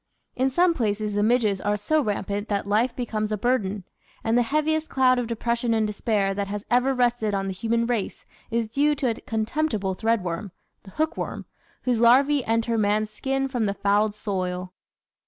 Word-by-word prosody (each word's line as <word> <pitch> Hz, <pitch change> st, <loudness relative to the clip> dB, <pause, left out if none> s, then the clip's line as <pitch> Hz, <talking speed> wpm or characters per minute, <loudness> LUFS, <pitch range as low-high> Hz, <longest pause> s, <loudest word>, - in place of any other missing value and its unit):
In 260 Hz, +1 st, +2 dB
some 345 Hz, +6 st, +3 dB
places 215 Hz, -6 st, -1 dB
the 205 Hz, -, +1 dB
midges 215 Hz, -3 st, +2 dB
are 205 Hz, 0 st, 0 dB
so 305 Hz, +10 st, +1 dB
rampant 205 Hz, -2 st, -2 dB
that 200 Hz, -1 st, -1 dB
life 220 Hz, +5 st, +1 dB
becomes 215 Hz, -3 st, -2 dB
a 215 Hz, -, 0 dB
burden, 210 Hz, -4 st, 0 dB, 0.4 s
and 225 Hz, +1 st, +1 dB
the 245 Hz, -, +5 dB
heaviest 305 Hz, +5 st, 0 dB
cloud 255 Hz, -1 st, +3 dB
of 240 Hz, -, -2 dB
depression 235 Hz, 0 st, -1 dB
and 220 Hz, -1 st, +2 dB
despair 210 Hz, -2 st, 0 dB
that 200 Hz, 0 st, -2 dB
has 205 Hz, +1 st, -5 dB
ever 250 Hz, +2 st, +3 dB
rested 240 Hz, -4 st, +1 dB
on 195 Hz, 0 st, -1 dB
the 195 Hz, -, -3 dB
human 230 Hz, +4 st, 0 dB
race 230 Hz, -4 st, -3 dB, 0.2 s
is 230 Hz, -1 st, 0 dB
due 290 Hz, +6 st, +2 dB
to 260 Hz, -4 st, 0 dB
a 225 Hz, -, -7 dB
contemptible 220 Hz, -3 st, -1 dB
threadworm 205 Hz, -2 st, -1 dB, 0.3 s
the 195 Hz, -, -14 dB
Hookworm 315 Hz, -, -3 dB, 0.4 s
whose 245 Hz, -3 st, +1 dB
larva? 265 Hz, +4 st, +5 dB
enter 230 Hz, 0 st, +1 dB
man's 210 Hz, +1 st, +1 dB
skin 270 Hz, +4 st, -1 dB
from 245 Hz, -4 st, -1 dB
the 200 Hz, -, -1 dB
fouled 205 Hz, +1 st, +1 dB
soil. 185 Hz, -3 st, -3 dB
225 Hz, 180 wpm, -25 LUFS, 205-250 Hz, 0.4 s, the